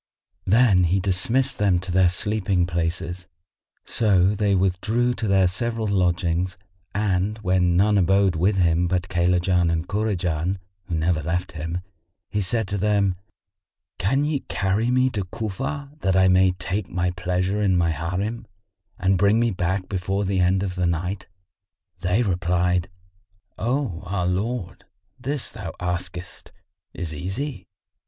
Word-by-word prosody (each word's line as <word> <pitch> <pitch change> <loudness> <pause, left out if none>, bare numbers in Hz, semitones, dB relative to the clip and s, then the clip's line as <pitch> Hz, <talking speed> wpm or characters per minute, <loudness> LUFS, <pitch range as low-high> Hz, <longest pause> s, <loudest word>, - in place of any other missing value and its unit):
Then 100 -3 +5
he 90 +3 +2
dismissed 105 +8 0
them 100 -3 +3
to 90 +1 -4
their 90 0 +4
sleeping 95 -1 0
places; 85 +1 -3 0.6
so 95 -5 +3
they 105 -1 +1
withdrew 105 +7 +1
to 115 -2 -3
their 95 -2 +4
several 115 +4 -2
lodgings, 90 -2 0 0.4
and 100 0 0
when 90 -2 +2
none 105 +2 +4
abode 95 0 +3
with 95 +6 +2
him 85 -1 +2
but 90 +1 -1
Kaylajan 90 0 +2
and 85 +1 -1
Kurajan, 95 -4 -1 0.3
who 90 -3 -3
never 80 0 +1
left 85 +4 -2
him, 85 +2 -4 0.5
he 105 - 0
said 110 +2 0
to 100 - -2
them, 100 -1 +2 0.9
"Can 135 +10 +2
ye 150 -2 0
carry 100 +4 0
me 130 +1 +3
to 105 -5 -2
Cufa 115 +9 -4
that 95 -8 +1
I 95 0 +5
may 95 0 +4
take 90 +2 -3
my 90 0 0
pleasure 90 +3 -1
in 95 -3 +3
my 85 -1 +2
Harim, 90 +9 -3 0.5
and 95 0 +2
bring 100 +3 +4
me 120 -1 +2
back 90 +1 -1
before 95 +1 -1
the 95 0 0
end 95 +2 +2
of 95 -2 -2
the 90 -1 0
night?" 90 +3 -2 0.7
They 90 +7 +1
replied, 90 -2 +1 0.7
"O 120 - -1
our 90 -1 -1
lord, 95 +2 -2 0.4
this 140 0 -3
thou 95 -6 -7
askest 90 0 -5 0.4
is 85 -2 -5
easy." 95 - -4
95 Hz, 145 wpm, -23 LUFS, 90-105 Hz, 0.9 s, Then